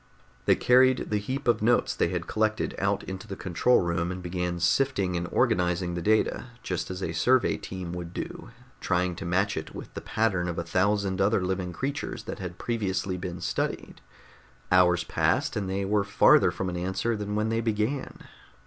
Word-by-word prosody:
They - - +5
carried 130 0 +4
the 105 - +2
heap 130 +7 -4
of 120 - +3
notes 120 +3 +3
they - - +1
had - - -3
collected 110 0 0
out - - 0
into 95 0 -7
the 95 - -5
control 95 +8 +2
room 85 0 -1
and 90 0 -6
began 90 0 -2
sifting 100 -2 +1
and 85 0 -2
organizing 90 0 +1
the 85 - -3
data, 110 +6 +1 0.2
just 90 -2 -3
as 95 +1 -5
a 80 - -2
survey 125 +8 +3
team 90 -2 -6
would 90 -1 -6
do, - - -6 0.3
trying 90 0 0
to - - -6
match 95 +4 +1
it 80 - -6
with - - -9
the - - -6
pattern 95 -6 0
of 85 - -4
a 85 - -1
thousand 95 +2 +1
other 100 -1 +2
living 95 -1 -2
creatures 140 - -4
that - - -6
had 90 -2 -6
previously 100 -5 -2
been 90 -1 -6
studied. - - -3 0.7
Hours 90 -2 +5
passed, - - 0
and 100 -3 -2
they 95 +1 -1
were 100 +1 +2
farther 100 0 +5
from 95 - -3
an 90 -1 -3
answer 95 +6 -1
than 105 -1 -3
when 105 +1 0
they 115 0 0
began. 115 +4 -2
95 Hz, 190 wpm, -27 LUFS, 90-110 Hz, 0.7 s, They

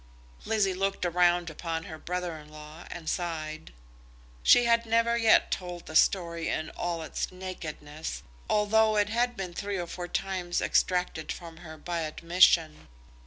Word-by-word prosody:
Lizzie 210 -4 +1
looked 195 0 -1
round 175 -1 +2
upon 165 +1 -4
her 160 -1 -9
brother 180 -1 -3
in 150 0 -14
law 155 +2 -11
and 165 -2 -8
sighed. 155 - -3 0.7
She 245 - +6
had 230 0 +3
never 230 +1 +3
yet 225 -2 +4
told 180 -2 -4
the 160 - -9
story 170 -1 +2
in 155 - -2
all 170 -2 -3
its - - -4
nakedness, 160 -5 -7 0.3
although 215 +1 +3
it 205 -1 +2
had 240 +2 0
been 185 -2 -5
three 200 +2 -3
or 175 - -2
four 175 +1 -6
times 180 -1 -2
extracted 180 -3 0
from 165 -2 -8
her 160 -2 -10
by 170 +1 -3
admission. 165 0 +3
175 Hz, 155 wpm, -28 LUFS, 160-195 Hz, 0.7 s, She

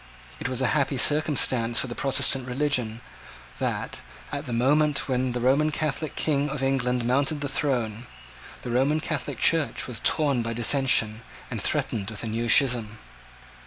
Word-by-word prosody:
It - - -3
was 130 0 -3
a - - +2
happy 140 -2 0
circumstance 130 -5 +3
for - - +1
the 120 - -6
Protestant 135 -1 +1
religion 125 -4 -1 0.6
that, - - -3 0.3
at 145 0 -5
the - - -5
moment 145 +5 +2
when 130 -1 -1
the 125 - -2
last 120 - -3
Roman 145 +4 +3
Catholic 155 0 -3
King 145 -1 0
of 135 -1 -4
England 125 -2 0
mounted 140 +4 +1
the 145 - -2
throne, 120 -5 -2 0.6
the 120 - -5
Roman 135 +6 +2
Catholic 155 -1 -4
Church 165 -3 +1
was 125 -4 -6
torn 140 -5 +2
by 115 0 -3
dissension, 115 -2 +3 0.3
and - - -4
threatened 100 -3 -2
with 110 -1 -7
a - - -3
new 115 +2 -2
schism. 120 -6 +3
130 Hz, 165 wpm, -25 LUFS, 120-145 Hz, 0.6 s, circumstance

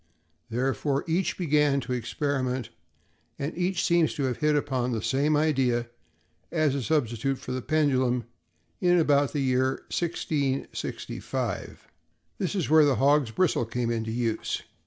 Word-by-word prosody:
Therefore, 135 +3 0
each 170 +3 0
began 150 -4 +2
to 125 +1 -4
experiment, 130 0 -2 0.7
and 140 +3 -4
each 180 0 0
seems 170 -2 +3
to 145 - -2
have 130 -3 -1
hit 150 0 +2
upon 130 -4 0
the 110 - -2
same 145 +3 +2
idea 130 -6 +1 0.6
as 155 -4 +2
a 140 - -1
substitute 135 -2 0
for 125 - -8
the 130 0 -2
pendulum 130 -5 +1 0.6
in 180 -1 +4
about 145 -4 +3
the 145 - -1
year 130 0 +1
1665. 145 -5 -3 0.5
This 190 +2 -1
is 180 -6 0
where 155 +1 +6
the 145 -3 +3
hog's 140 +1 +3
bristle 160 +1 +1
came 120 0 -1
into 110 -1 -2
use. 115 -1 -2
140 Hz, 140 wpm, -27 LUFS, 125-155 Hz, 0.7 s, where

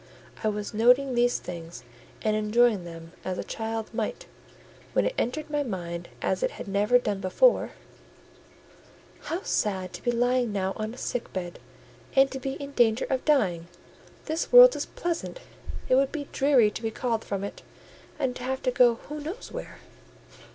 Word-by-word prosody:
I - - +2
was 210 0 -3
noting 250 +5 +4
these 245 0 +2
things 170 -6 -8 0.4
and 215 -1 +2
enjoying 215 -2 +2
them 165 -1 -10
as 185 -1 -3
a - - -3
child 225 0 -4
might, 220 -1 -3 0.7
when - - +2
it - - 0
entered 295 +6 -2
my 295 -1 +1
mind 175 -8 -5
as - - 0
it - - +2
had - - -7
never 205 +5 +3
done 210 -5 -2
before:— 345 - +3 1.5
"How 345 +4 -3
sad 190 -3 -1
to - - -8
be 245 - -1
lying 245 0 +1
now 190 -1 -1
on 215 +2 -4
a - - -15
sick 245 - -4
bed, 175 -2 -5 0.6
and 270 0 +5
to 265 - -5
be 270 +1 -3
in 280 0 -7
danger 235 -3 +3
of 260 -1 0
dying! 185 - +2 0.6
This 320 +2 -2
world - - +10
is - - -3
pleasant—it 345 - -5
would 270 +1 +4
be 290 -3 -5
dreary 265 -6 +4
to - - -7
be 225 - -1
called 230 -1 -2
from 200 -1 -3
it, 200 - -6 0.6
and 265 -4 -1
to - - -8
have 265 +1 -3
to 255 - +2
go 245 -1 +5
who 300 +1 -6
knows 320 +7 -7
where?" - - -7
240 Hz, 175 wpm, -27 LUFS, 200-270 Hz, 1.5 s, world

